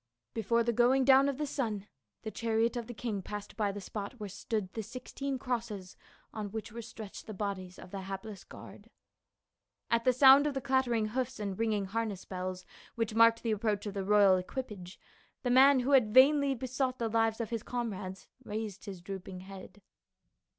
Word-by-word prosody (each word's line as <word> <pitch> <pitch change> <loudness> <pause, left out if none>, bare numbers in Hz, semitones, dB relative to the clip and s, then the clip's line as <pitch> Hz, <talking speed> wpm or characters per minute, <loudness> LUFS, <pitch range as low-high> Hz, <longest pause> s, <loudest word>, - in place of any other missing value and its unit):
Before 230 +1 +1
the 235 0 0
going 255 +3 +4
down 270 +1 +6
of 275 - -3
the 300 - -1
sun 225 -8 -3 0.4
the 220 - -4
chariot 230 +1 0
of 235 -2 -4
the 240 - -6
king 215 -4 -3
passed 205 +2 -7
by 210 -3 0
the 205 - -6
spot 205 +2 -6
where 210 -1 -5
stood 200 0 -3
the 225 - -3
sixteen 255 +4 -5
crosses 230 -7 -4 0.4
on 210 -2 -4
which 220 0 -5
were 235 +2 -6
stretched 220 -2 -9
the 215 - -6
bodies 185 -2 -4
of - - -12
the 195 - -5
hapless 195 +1 -7
guard. - - -13 1.0
At 230 0 +3
the 255 - +5
sound 270 +3 +7
of 285 - -2
the - - 0
clattering 255 -5 +1
hoofs 255 +2 -3
and 200 -2 -3
ringing 215 -2 0
harness 210 -1 -3
bells 185 0 -5 0.3
which 230 -2 -1
marked 230 0 +5
the 230 - 0
approach 210 -1 0
of 205 - -4
the 195 -1 -3
royal 200 -1 +5
equipage, 190 -2 -6 0.4
the 245 - +1
man 265 +1 +7
who 260 +3 -1
had 240 -5 +4
vainly 280 +1 +6
besought 255 +1 -2
the 230 - -1
lives 225 0 +1
of 230 -1 -3
his 230 -2 -2
comrades 200 -7 -5 0.2
raised 215 -2 -5
his 190 -4 -7
drooping 190 0 -7
head. 195 +1 -11
220 Hz, 190 wpm, -31 LUFS, 200-245 Hz, 1.0 s, sound